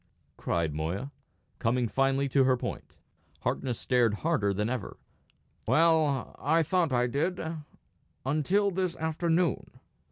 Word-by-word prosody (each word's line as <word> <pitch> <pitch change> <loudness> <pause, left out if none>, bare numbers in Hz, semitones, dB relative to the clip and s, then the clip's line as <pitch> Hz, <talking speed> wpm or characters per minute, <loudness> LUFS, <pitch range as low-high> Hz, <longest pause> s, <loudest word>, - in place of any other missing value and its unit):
cried 85 -3 -1
Moya, 85 - -3 0.5
coming 120 +1 +1
finely 135 +3 +1
to 135 0 +3
her 130 -1 +3
point. - - -6 0.4
Harkness 125 -3 -2
stared 120 -4 +2
harder 135 -12 +2
than 105 +2 -1
ever. 120 -4 -4 0.7
"Well, 155 -4 +3
I 160 +3 +2
thought 170 -1 +1
I 125 -1 +2
did 155 +9 -1 0.9
until 180 +9 +1
this 185 -1 -1
afternoon." 165 +2 -1
135 Hz, 120 wpm, -29 LUFS, 120-165 Hz, 0.9 s, to